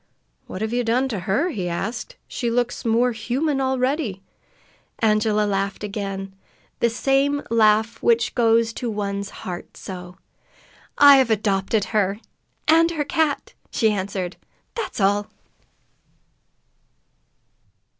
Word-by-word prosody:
"What 190 - -5
have 220 +1 -2
you 245 0 +1
done 245 +3 +1
to 215 -6 -3
her?" 275 - +2
he 185 - -3
asked. 220 - -4
"She 240 - -2
looks 245 +2 -1
more 235 +1 +2
human 265 +6 -1
already." 260 - -1 0.7
Angela 215 -1 +2
laughed 200 0 -2
again, 195 -2 -4 0.5
that 235 - +3
same 275 +4 +1
laugh 220 0 +3
which 235 -1 +2
goes 230 -1 +3
to 240 - -4
one's 200 -1 -3 0.2
heart 175 -2 -7
so. 180 -1 -8 0.8
"I 285 -1 +9
have 260 -3 +3
adopted 205 -1 +1
her 205 -1 +1 0.5
and 330 +2 +5
her 310 -4 -2
cat!" 310 0 0 0.2
she 220 -2 +2
answered. 190 -2 -3 0.4
"That's 460 - -4
all!" 205 +1 +2
225 Hz, 120 wpm, -22 LUFS, 200-255 Hz, 0.8 s, I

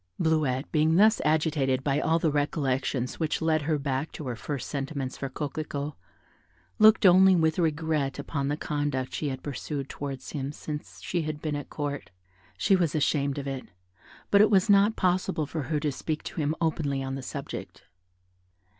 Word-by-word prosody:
Bleuette 155 -5 +1
being 155 +1 +3
thus 215 +4 +5
agitated 150 -4 +1
by 140 0 +1
all 160 +2 +2
the 160 -2 +1
recollections 135 -3 -1
which 160 -2 0
led 160 -1 +2
her 155 +1 0
back 140 +1 -2
to 150 - -7
her 125 -2 -3
first 135 +3 -5
sentiments 135 -2 -3
for 135 - -4
Coquelicot, 145 +1 -4 0.9
looked 215 0 +7
only 190 +1 +7
with 160 0 +2
regret 155 -4 0
upon 140 0 -3
the 145 +1 -1
conduct 145 -4 -2
she 150 - -2
had 130 -1 -5
pursued 140 0 -4
towards 140 -2 -6
him 140 -2 -3
since 150 0 -7
she 175 - -1
had 155 -1 -4
been 150 -1 -2
at 145 -1 -6
Court. 145 -1 -4 0.5
She 195 - +3
was 170 -5 +1
ashamed 145 -2 +1
of 140 - -4
it, 135 -1 -4 0.7
but 200 - +7
it 215 - +6
was 200 0 +4
not 205 +2 +5
possible 185 -3 +1
for 155 +2 -4
her 155 -2 +1
to 150 -1 0
speak 155 +3 -4
to 165 - -4
him 150 +2 0
openly 145 -4 0
on 135 0 -4
the 135 - -4
subject. 130 - -7
150 Hz, 180 wpm, -27 LUFS, 140-160 Hz, 0.9 s, looked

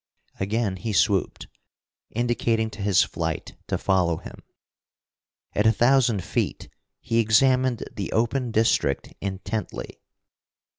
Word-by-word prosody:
Again 100 0 -1
he 110 +3 -4
swooped, 95 -1 +1 0.6
indicating 115 -1 0
to 105 - -9
his 100 -2 +4
flight - - -4
to - - -1
follow 90 -4 +1
him. - - -11 1.1
At 105 +2 +2
a - - +7
thousand 120 -3 +3
feet - - -2 0.3
he 115 -2 0
examined 125 +2 +3
the 100 - -4
open 120 +2 0
district 110 -11 +1
intently. 100 +3 -5
110 Hz, 110 wpm, -25 LUFS, 100-120 Hz, 1.1 s, a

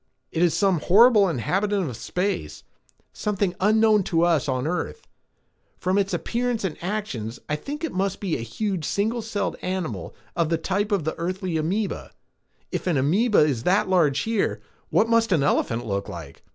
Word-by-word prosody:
"It 165 - -1
is 175 -2 +3
some 195 -5 +2
horrible 210 +3 +6
inhabitant 190 - 0
of 125 - -5
space, 180 - -3 0.5
something 200 -3 -1
unknown 215 +1 +4
to 165 -3 +2
us 165 -5 +2
on 130 0 -1
earth. 180 - -3 0.7
From 185 +2 +1
its 200 0 0
appearance 235 +5 -1
and 185 -5 -2
actions, 175 - -3
I 150 - 0
think 290 - -6
it 325 - -1
must 195 +1 -1
be 190 -6 -1
a - - -3
huge 185 - -3
single 220 +8 0
celled 210 -2 -3
animal 175 - -4 0.2
of 170 -2 +1
the 165 - +2
type 200 +6 -1
of 200 -5 +1
the 160 - -1
earthly 185 0 -2
amoeba. 190 +7 -1 0.6
If - - -3
an 170 -5 +2
amoeba 200 - +3
is 145 -6 +2
that 185 - +2
large 150 -7 +3
here, 225 -2 0 0.3
what 225 - +3
must 230 -1 +2
an 160 -6 +3
elephant 120 -4 +1
look 100 -2 -2
like? 80 -5 -9
185 Hz, 175 wpm, -24 LUFS, 155-210 Hz, 0.7 s, horrible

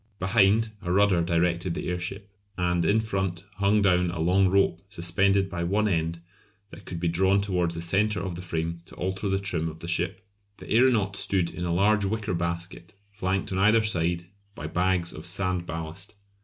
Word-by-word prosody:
Behind, 105 +3 +3
a 90 - -3
rudder 100 -2 +4
directed 85 +1 0
the - - -4
airship, 90 +3 -4 0.3
and 90 -1 +1
in 110 +2 +3
front 95 -4 -3
hung 100 +1 +3
down 90 -2 +3
a 85 -1 -5
long 95 +4 +3
rope 100 +1 +2
suspended 95 +2 +2
by 85 -2 -4
one 105 +5 +1
end 85 -3 -1 0.5
that - - -12
could 85 - -5
be 85 - -1
drawn 95 +4 +3
towards 90 -4 0
the 85 - -4
centre 100 +3 +1
of 95 -1 -4
the 85 - -6
frame 85 -1 -3
to - - -14
alter 95 +2 -2
the 95 - +1
trim 90 -5 -2
of 80 - -10
the 85 - -8
ship. 90 +2 -1 0.4
The - - -11
aeronaut 110 -5 +3
stood 95 -3 0
in 90 - -5
a 85 - -1
large 100 +4 +3
wicker 105 0 -2
basket 85 +1 -4 0.2
flanked 95 -2 -2
on 95 - -1
either 110 +3 +4
side 85 -4 0 0.3
by 75 - -7
bags 90 +1 0
of - - -7
sand 90 -2 0
ballast. 80 +5 -6
90 Hz, 190 wpm, -26 LUFS, 85-100 Hz, 0.5 s, rudder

